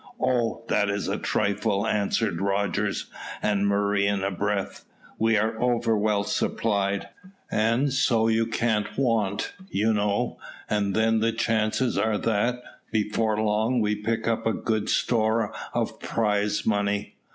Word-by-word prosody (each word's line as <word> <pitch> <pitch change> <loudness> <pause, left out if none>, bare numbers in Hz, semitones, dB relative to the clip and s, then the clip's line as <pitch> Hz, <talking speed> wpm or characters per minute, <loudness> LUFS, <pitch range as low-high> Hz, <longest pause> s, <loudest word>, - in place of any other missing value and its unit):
"Oh, 120 -3 0
that 105 -1 +2
is 100 0 -2
a - - -1
trifle," 100 0 0
answered 105 -3 0
Rogers 100 0 0 0.3
and 100 -1 +1
Murray 100 0 +2
in 100 -1 0
a 100 - 0
breath. 100 +1 -2 0.4
"We 110 0 +3
are 110 +2 -1
over 120 -2 +2
well 105 -1 +1
supplied, 100 -2 -1 0.4
and 115 +6 +2
so 120 -5 +3
you 115 0 +2
can't 110 -2 -1
want, 115 -7 0 0.2
you 110 - +1
know; 100 -1 0 0.3
and 100 -2 0
then 110 0 +3
the 115 +1 +2
chances 115 +2 0
are 110 -1 +1
that, 120 +4 0 0.3
before 110 0 0
long, 110 +3 +1
we 105 -1 +1
pick 115 +2 -2
up 115 -1 0
a 110 - +2
good 110 -2 -1
store 110 -2 +1 0.2
of - - -2
prize 105 -1 0
money." 100 -1 0
110 Hz, 140 wpm, -26 LUFS, 100-115 Hz, 0.4 s, We